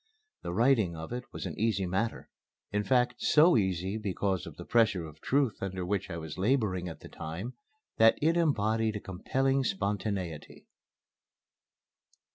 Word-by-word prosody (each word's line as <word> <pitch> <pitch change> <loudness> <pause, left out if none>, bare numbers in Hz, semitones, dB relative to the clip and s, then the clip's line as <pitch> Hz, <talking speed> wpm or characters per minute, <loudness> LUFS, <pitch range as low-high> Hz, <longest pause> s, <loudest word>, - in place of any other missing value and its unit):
The - - -4
writing 110 -3 +3
of 80 +7 -6
it 125 0 -4
was - - -6
an - - -4
easy 105 -3 +1
matter; 95 +6 -2 0.4
in 105 0 0
fact, 125 0 +1
so 160 +4 +5
easy, 95 0 0
because 100 -3 -1
of - - -9
the - - -8
pressure 110 -7 +2
of 80 0 -12
truth 135 -5 +1
under 95 -2 -3
which 100 +1 -2
I 85 - -4
was 80 +1 -7
laboring 100 -5 +1
at 80 - -10
the - - -10
time, 90 +11 -6 0.4
that 115 0 +6
it 160 +3 +2
embodied 110 -9 +1
a - - -2
compelling 135 +9 0
spontaneity. 100 - -3
105 Hz, 155 wpm, -30 LUFS, 90-120 Hz, 0.4 s, that